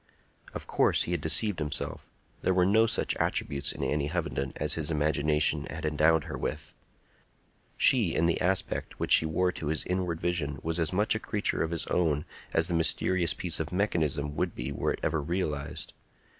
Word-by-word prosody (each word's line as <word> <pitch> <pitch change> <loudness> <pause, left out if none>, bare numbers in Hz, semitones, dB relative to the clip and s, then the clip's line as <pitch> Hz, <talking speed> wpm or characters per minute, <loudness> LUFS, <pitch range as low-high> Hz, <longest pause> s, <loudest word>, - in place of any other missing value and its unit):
Of - - -6
course - - +2
he - - -4
had 85 -4 -1
deceived 90 +4 +2
himself; 75 -2 -3 0.4
there 95 - +1
were 90 -1 +3
no 110 +4 +4
such 115 - +1
attributes 70 -1 0
in - - -6
Annie 75 -1 -1
Hovenden 75 -5 -3
as - - -1
his 75 -2 0
imagination 75 0 +1
had 80 0 -6
endowed 75 +1 +2
her - - -7
with. 80 +2 -5 1.0
She, 115 -10 +5
in 80 - +2
the 85 - 0
aspect 95 +1 -1
which - - -3
she 80 - +7
wore 90 +3 0
to 80 - -6
his 80 +1 0
inward 90 -3 -2
vision, 80 -5 -2
was 80 +1 -1
as 80 -2 0
much 105 +4 +3
a 110 - -2
creature 105 -2 -1
of 80 - -1
his 85 -2 -2
own 75 -4 0 0.3
as 80 - +1
the 90 - -3
mysterious 85 +1 +2
piece 90 -2 0
of 80 0 -4
mechanism 80 -7 -1
would 90 +2 -2
be 60 +3 -4
were - - -1
it - - -7
ever 80 -1 0
realized. 75 -2 -4
80 Hz, 190 wpm, -28 LUFS, 75-90 Hz, 1.0 s, she